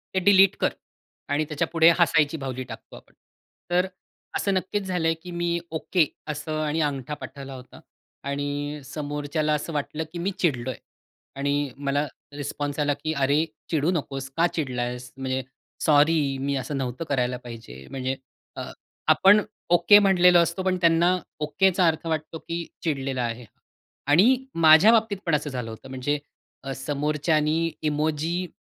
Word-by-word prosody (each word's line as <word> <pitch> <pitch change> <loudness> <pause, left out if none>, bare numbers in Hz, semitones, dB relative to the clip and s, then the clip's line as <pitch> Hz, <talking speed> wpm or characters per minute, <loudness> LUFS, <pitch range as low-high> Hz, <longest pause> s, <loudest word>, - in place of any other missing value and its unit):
ते - - +4
डिलीट 195 0 +6
कर - - +2 0.6
आणि 150 +2 +1
त्याच्यापुढे 165 +2 +3
हसायची 150 -1 +3
बाहुली 130 -2 -4
टाकतो 125 - -11
आपण. - - -16 0.6
तर 180 +2 +3 0.5
असं 200 - 0
नक्कीच 190 +2 -1
झालंय 175 -3 0
की 180 - -8
मी 170 0 -1
ओके 160 0 +1 0.2
असं 155 +1 -3
आणि 155 +2 -1
अंगठा 145 -1 -2
पाठवला 140 -2 -8
होता. 130 -1 -12 0.4
आणि 145 +1 -3
समोरच्याला 150 +1 -2
असं 150 +2 -3
वाटलं 150 +2 -2
की 170 - -5
मी 195 +3 -1
चिडलोय. 130 -7 0 0.6
आणि 140 0 -1
मला 140 +1 0 0.3
रिस्पॉन्स 145 0 -4
आला 145 -1 +2
की 155 0 -1
"अरे 140 +3 +2 0.2
चिडू 160 +2 +1
नकोस. 135 -5 -3
का 170 +1 +4
चिडलास? 125 -4 -3
म्हणजे 130 0 -2 0.4
सॉरी, 150 -2 +4
मी 140 +1 -1
असं 135 +2 -3
नव्हतं 130 +2 -3
करायला 125 -2 0
पाहिजे". 110 - -10
म्हणजे 130 0 -2 0.4
अ, - - -5 0.5
आपण 205 +2 +6 0.3
ओके 205 +4 +7
म्हटलेलो 180 -3 +5
असतो, 170 +2 0
पण 185 -1 +1
त्यांना 170 +2 +4 0.2
ओकेचा 180 +3 +2
अर्थ 160 +1 0
वाटतो 160 0 -3
की 170 +1 -5 0.2
चिडलेला 135 -5 -1
आहे. 120 0 -4 0.6
आणि 245 - +4 0.2
माझ्या 160 +8 +8
बाबतीत 220 -3 +2
पण 165 -3 +2
असं 150 0 -2
झालं 125 -3 -4
होतं. 110 +4 -11
म्हणजे 135 +3 -1 0.4
अ, 135 - -4
समोरच्याने 150 +3 0 0.3
इमोजी, 155 +4 -1
150 Hz, 145 wpm, -25 LUFS, 135-170 Hz, 0.6 s, माझ्या